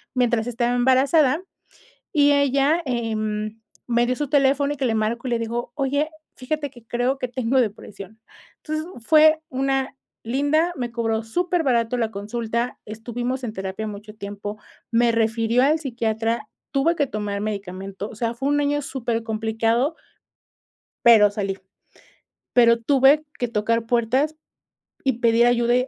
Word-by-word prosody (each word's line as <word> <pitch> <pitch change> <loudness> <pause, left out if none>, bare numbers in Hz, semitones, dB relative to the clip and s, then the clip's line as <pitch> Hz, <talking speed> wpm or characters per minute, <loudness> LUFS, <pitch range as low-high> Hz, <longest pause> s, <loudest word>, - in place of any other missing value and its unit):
mientras 240 -2 +1
estaba 240 0 0
embarazada 265 +4 +3 0.7
y 290 -2 +5
ella, 280 +3 +2
em, 215 -3 -2 0.3
me 240 0 +2
dio 250 +1 0
su 295 0 -3
teléfono 280 0 +3
y - - -9
que 265 - -1
le 225 -3 +1
marcó 225 +4 -1
y 245 - -2
le 235 - +1
dijo: 235 +1 -3
"Oye, 285 +1 0 0.3
fíjate 285 +3 -3
que 240 -3 -17
creo, 245 +4 0
que 255 - -3
tengo 255 +1 0
depresión". 210 -2 -4 0.4
Entonces, 310 0 -4 0.2
fue 310 +1 +6
una 270 0 -1 0.3
linda, 290 +8 +1
me 240 -2 -3
cobró 225 -1 -1
súper 350 +9 0
barato 240 -3 +1
la 230 -2 0
consulta, 230 +3 -3
estuvimos 240 +4 -4
en 220 - -4
terapia 190 +2 -4
mucho 210 +1 -8
tiempo, 205 0 -6 0.3
me 235 0 +3
refirió 225 +1 +1
al 300 +4 +4
psiquiatra, 230 -4 -2 0.2
tuve 295 +5 +2
que 290 - +1
tomar 205 -2 -3
medicamento, 195 -1 -5
o - - -11
sea, 230 +2 -2
fue 270 +4 -2
un 290 0 +2
año 290 0 0
súper 240 -4 -2
complicado 225 +5 0 1.1
pero, 220 -3 +7
salí. 195 -2 -3 1.0
Pero, 235 -1 +6
tuve 275 +4 +4
que 245 - -1
tocar 230 +1 0
puertas 245 +6 +1 0.7
y 265 -2 +2
pedir 235 0 +4
ayuda 240 0 +3
240 Hz, 150 wpm, -23 LUFS, 225-270 Hz, 1.1 s, pero